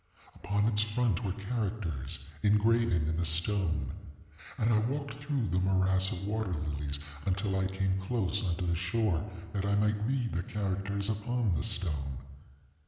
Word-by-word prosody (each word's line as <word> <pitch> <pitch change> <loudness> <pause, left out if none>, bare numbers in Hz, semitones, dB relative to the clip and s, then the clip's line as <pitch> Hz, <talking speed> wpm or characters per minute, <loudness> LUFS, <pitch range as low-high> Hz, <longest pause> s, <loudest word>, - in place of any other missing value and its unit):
Upon 100 +1 0
its 105 -2 +3
front 105 -2 +1
were 95 - 0
characters 100 - -3 0.2
engraven 105 -5 +3
in 80 0 0
the 85 - +1
stone; 80 -4 +1 0.6
and 115 -1 +3
I 110 - +5
walked 140 +3 -2
through 140 -4 -2
the 90 +3 +2
morass 95 0 +3
of 95 -2 -4
water 105 -2 -1
lilies, 75 -2 -2 0.3
until 95 +1 +1
I 95 - +2
came 95 0 0
close 100 -1 0
unto 90 -1 -1
the 85 -1 +1
shore, 90 0 +1 0.3
that 100 - -1
I 100 0 +2
might 105 0 +2
read 130 -3 0
the 90 - 0
characters 100 0 -2
upon 110 0 0
the - - +1
stone. 75 -10 -2
100 Hz, 160 wpm, -31 LUFS, 90-110 Hz, 0.6 s, I